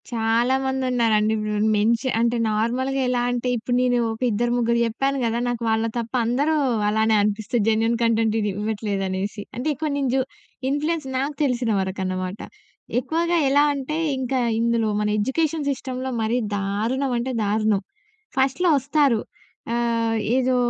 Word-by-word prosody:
చాలా 235 +2 +1
మందున్నారండి. 245 -5 +1
ఇప్పుడు 210 0 -1
మెన్ష 225 +3 +2 0.2
అంటే 235 +1 +2
నార్మల్‌గా 255 +5 0
ఎలా 245 -1 +1
అంటే 245 0 -1
ఇప్పుడు 245 +2 -2
నేను, 250 -1 +2 0.2
ఒక 225 - -11
ఇద్దరు 235 +3 0
ముగ్గురు 235 0 +1
చెప్పాను 270 +5 -1
కదా! 230 +1 0
నాకు 240 -1 -3
వాళ్ళ 220 0 +1
తప్ప 235 0 -4
అందరూ 280 +7 +1 0.3
అలానే 220 +1 +2
అనిపిస్తది 215 +3 0
జెన్యూన్ 225 +1 +2
కంటెంట్ 225 -1 +2
ఇది 210 -1 0
ఇవ్వట్లేదనేసి. 205 -1 -2
అంటే 250 - -3
ఎక్కువ 305 +3 -3
నేను 275 -2 0
జు 265 - +3 0.5
ఇన్‌ప్ల్యూయన్స్ 300 +1 -1
నాకు 280 +3 -2
తెలిసినవరకనమాట. 190 -6 -1 0.6
ఎక్కువగా 335 +6 0
ఎలా 285 +2 +5
అంటే, 280 +3 -3 0.2
ఇంక 260 0 -3 0.3
ఇందులో 230 -1 +1
మన 210 - 0
ఎడ్యుకేషన్ 295 +6 0
సిస్టమ్‌లో 260 -1 -4
మరీ 220 +2 +1 0.2
దారుణమంటే 235 +6 -1
దారుణం. 210 -1 +1 0.6
ఫస్ట్‌లో 270 +7 +2
వస్తారు. 275 -4 +2 0.5
ఆహ్, 230 -1 0 0.2
ఏదో 260 0 +2
235 Hz, 135 wpm, -23 LUFS, 220-265 Hz, 0.6 s, ఎలా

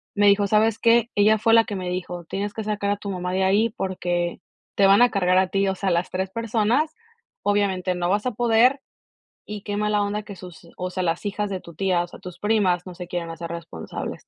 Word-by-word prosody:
me 205 0 +4
dijo: 200 0 +4
"¿Sabes 215 +2 +2
qué?" 235 0 +4
Ella 210 +2 +4
fue 225 +1 +2
la 230 0 +7
que 205 - -5
me 185 -2 -4
dijo: 180 -1 -5
"Tienes 200 +4 -4
que 220 - -4
sacar 210 -1 -2
a 205 - 0
tu 200 0 -6
mamá 180 -1 -3
de 190 +1 +1
ahí, 205 +4 +3
porque 175 -2 -2 0.4
te 195 - +5
van 200 +3 +6
a 245 - +4
cargar 185 -2 +2
a 190 0 +3
ti, 195 +1 +1
o 190 - 0
sea, 190 0 -1
las 170 +1 0
3 190 +1 -2
personas, 230 +7 0 0.5
obviamente 195 -3 +1
no 175 0 -1
vas 205 +4 +1
a 250 - +1
poder, 240 +4 +3 0.6
y 210 -1 -7
qué 205 -1 -4
mala 210 0 +1
onda 205 +1 -2
que 205 -1 -9
sus 175 -2 -12
o 180 0 -3
sea, 185 - -3
las 170 +3 -1
hijas 205 0 -2
de 190 -2 -3
tu 170 - -13
tía, 180 0 +1
o - - -8
sea, - - -13
tus 180 -1 -10
primas 200 -4 +1
no 185 - -8
se 180 0 -8
quieren 175 -2 -4
hacer 165 +1 -7
responsables. 165 - -7
195 Hz, 240 wpm, -23 LUFS, 180-210 Hz, 0.6 s, la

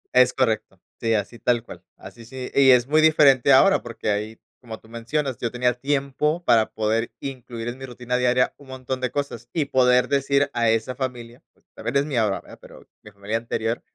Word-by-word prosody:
Es 125 0 +6
correcto, 120 -4 -1 0.2
sí, 115 -1 +1
así 105 +3 -4
tal 120 -2 +1
cual, - - -12
así 120 - -13
sí 130 +2 -8
y 135 -1 +5
es 125 -2 +6
muy 155 +2 +3
diferente 140 -4 +5
ahora, 195 +9 +5
porque 115 -2 -4
ahí, 105 +2 -4 0.2
como 115 -3 -9
tú - - -21
mencionas, 120 +3 -3
yo 120 - -2
tenía 125 0 +1
tiempo 140 +5 -1
para 115 -2 +3
poder 110 +1 -1
incluir 125 -4 -7
en 125 +2 -8
mi 135 - -7
rutina 125 0 -4
diaria 125 0 +2
un 140 - -17
montón 130 0 -5
de 125 - -1
cosas, 140 +2 -5
y 155 -4 0
poder 125 -2 +3
decir 140 0 +1
a 115 -1 +1
esa 115 +3 0
familia, 125 -2 -6
pues, - - -35
también - - -5
es 140 - +1
mía 130 -6 0
ahora, 100 -2 -1
¿verdad? - - -15
Pero - - -15
mi 105 - -13
familia 100 +2 -4
anterior. 115 0 -3
125 Hz, 205 wpm, -23 LUFS, 115-135 Hz, 0.2 s, Es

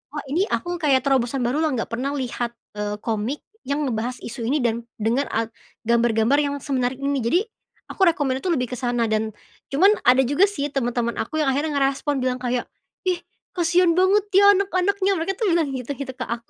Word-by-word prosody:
"Oh, 295 - -3
ini 365 +7 +1
aku, 350 0 -2
kayak, 270 -4 +3
terobosan 265 -1 +1
baru 255 +5 0
loh, 320 - +2
nggak 230 - -3
pernah 250 +4 -2
lihat, 240 -3 -3 0.2
eee, 210 0 -3
komik 225 +5 -2 0.2
yang 285 +2 -1
ngebahas 245 0 -2
isu 235 0 -5
ini, 295 - +2
dan 235 0 0 0.2
dengan 235 +5 +1
at 225 0 -1 0.4
gambar-gambar 235 +2 +3
yang 285 -1 -1
semenarik 260 -3 -1
ini." 280 0 0
Jadi, 240 +10 +3 0.5
aku - - -8
recommend-nya 275 -5 +1
itu, - - +2
lebih 250 -5 -1
ke 250 - -4
sana, 240 -2 0
dan 220 0 0 0.4
cuman, 360 +9 +5 0.2
ada 255 +1 +7
juga 285 +10 +4
sih, 290 -8 -2
teman-teman 240 -3 -1
aku, 310 +8 -3
yang 270 - +2
akhirnya 290 +4 -1
ngerespon 275 +1 0
bilang 255 0 0
kayak, 245 -1 -1 0.4
"Ih, 360 -2 +1 0.4
kasihan 350 0 +3
banget 380 +3 +4
ya, 400 - +7
anak-anaknya," 390 0 +1
mereka 335 +4 -1
tuh 445 - +1
bilang 330 -3 +2
gitu 250 +1 -5
gitu 265 -2 -5
ke, 255 - -4
aku. 235 0 -5
265 Hz, 195 wpm, -23 LUFS, 240-315 Hz, 0.5 s, ada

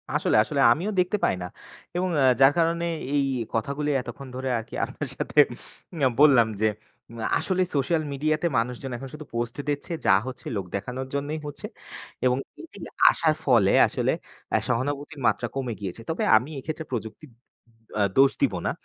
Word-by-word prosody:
আসলে, - - +1
আসলে 140 +4 -1
আমিও 170 - 0
দেখতে 180 +4 +2
পাই - - +2
না, - - -3 0.5
এবং 185 +1 0
অ্যা 135 - +4 0.2
যার 135 +1 +8
কারণে 170 +1 +1 0.3
এই 140 - +3 0.3
কথাগুলি 140 +6 -1
এতক্ষণ 125 +3 -9
ধরে 130 +1 -3
আর 115 - -4
কি - - -16
আপনার - - -6
সাথে - - -6 0.6
অ্যা 135 - +4
বললাম, 135 -6 +6
যে 110 - +4 0.7
আসলে 185 -1 -1
সোশ্যাল 155 +4 +1
মিডিয়াতে 155 +4 0
মানুষজন 125 +3 -2
এখন 135 +2 -8
শুধু 150 0 -8
পোস্ট 120 0 -2
দিচ্ছে 145 +5 -3
যা - - +6
হচ্ছে 130 - -8
লোক 100 -3 -2
দেখানোর 125 +7 -4
জন্যই 145 +2 -2
হচ্ছে। 145 - -8 0.6
এবং 125 0 +3 0.4
এইটা - - -9 0.2
আসার 160 -2 +2
ফলে 115 -8 +4 0.2
আসলে - - 0 0.4
অ্যা - - +3
সহানুভূতির 145 +4 -2
মাত্রা 120 - +1
কমে 130 -3 -2
গিয়েছে। 100 +2 -6
তবে 160 - -1
আমি 125 +6 -3
এক্ষেত্রে 155 +3 -5
প্রযুক্তির 120 +5 -5 0.7
অ্যা 105 - +2
দোষ 135 0 +6
দিব 135 -6 +3
না। - - +2
135 Hz, 170 wpm, -25 LUFS, 120-155 Hz, 0.7 s, যার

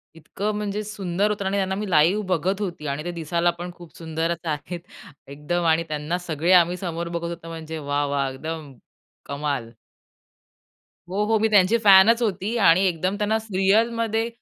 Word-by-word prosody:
इतकं 195 +6 -4
म्हणजे 210 0 -3
सुंदर 200 -1 -1
होतं 200 -2 -3
आणि 195 +1 0
त्यांना 190 -1 0
मी 205 0 -4
लाईव्ह 175 +6 +3
बघत 185 +2 0
होती 175 -7 -4
आणि 140 +2 -3
ते 175 - -4
दिसायला 170 +1 0
पण 175 0 -5
खूप 175 -2 -14
सुंदरच 165 +1 -3
आहेत, 160 +3 -4 0.5
एकदम. 150 +5 -3
आणि 165 0 +3
त्यांना 155 +3 -2
सगळे 165 +2 0
आम्ही 175 0 +5
समोर 170 -2 -4
बघत 170 0 -3
होतो 170 -1 -8
म्हणजे 160 -1 -7
वाह! 145 0 -1
वाह! 140 -1 0
एकदम 155 +1 -7 0.5
कमाल! 140 -5 -3 1.4
हो, 200 +3 0
हो. 220 +1 +2
मी 220 - +3
त्यांची 205 +1 +4
फॅनच 210 +4 +7
होती 205 +1 -1
आणि 185 -3 +5
एकदम 185 +3 -1
त्यांना 210 +1 0
असं 220 -3 -4
रिअलमध्ये, 225 +3 +2
175 Hz, 170 wpm, -23 LUFS, 160-205 Hz, 1.4 s, फॅनच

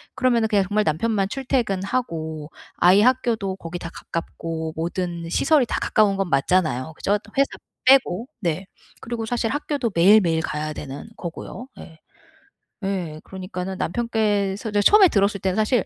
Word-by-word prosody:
그러면은 240 -3 +2
그냥 200 -2 +2
정말 210 +1 +1
남편만 195 +5 0
출퇴근하고 195 - -2 0.3
아이 185 +4 +6
학교도 230 -6 +1
거기 170 0 -7
다 170 - -6
가깝고 165 -1 -5
모든 170 0 -3
시설이 290 - +3
다 - - -1
가까운 210 -3 +3
건 195 -3 -1
맞잖아요, 150 -1 +1
그죠? 205 +1 +1 0.2
회사 275 - +5 0.4
빼고. 255 -4 +4
네. 180 +2 -2 0.3
그리고 230 -1 -4
사실 235 -1 -1
학교도 285 -5 -2
매일매일 170 -2 +5
가야 155 0 -3
되는 145 +9 -8
거고요. 180 +8 -7
예. 160 -1 -12 0.9
예, 175 -6 -3
그러니까는 185 0 -6
남편께서 210 -1 -1
저 205 0 +2
처음에 400 - +7
들었을 200 0 +1
때는 190 0 0
사실 220 0 +2
195 Hz, 335 characters per minute, -23 LUFS, 170-225 Hz, 0.9 s, 처음에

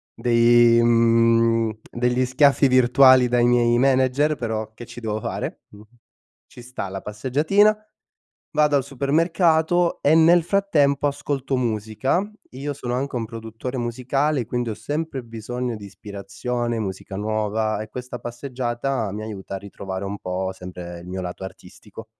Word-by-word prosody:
dei, 120 0 +4
mhmm, 115 -1 +3
degli 125 +1 0
schiaffi 140 +2 +4
virtuali 130 0 +5
dai 120 0 +2
miei 120 -1 +3
manager, 135 +3 +2
però 110 -2 -4
che 120 +1 -11
ci - - -10
devo 110 -2 -3
fare - - -5
mh? 105 0 -15 0.6
Ci 120 - -14
sta 125 -5 -6
la 95 0 -6
passeggiatina, 150 - +2 0.8
vado 150 -1 +3
al 135 - +1
supermercato 160 +5 +1
e 145 - +4
nel 165 +1 +6
frattempo 150 -7 +2
ascolto 140 -1 -3
musica. 120 - -1 0.2
Io 140 +3 -4
sono 125 -3 -4
anche 135 +2 -3
un 115 - -2
produttore 115 +3 -7
musicale, 130 +3 -1
quindi 120 0 -2
ho 110 - -3
sempre 150 +1 -4
bisogno 120 +2 -5
di 105 - -10
ispirazione, 105 +5 -4
musica 95 -2 -5
nuova 110 +1 -1
e 110 - -9
questa 125 +1 -7
passeggiata 120 -1 -3
mi 105 - -5
aiuta 100 -3 -6
a - - -5
ritrovare 95 -1 -7
un 100 - -4
po' 95 +1 -3
sempre 90 -2 -9
il 85 - -13
mio 95 +1 -4
lato 90 +1 -6
artistico. 95 +3 -11
120 Hz, 145 wpm, -22 LUFS, 110-135 Hz, 0.8 s, nel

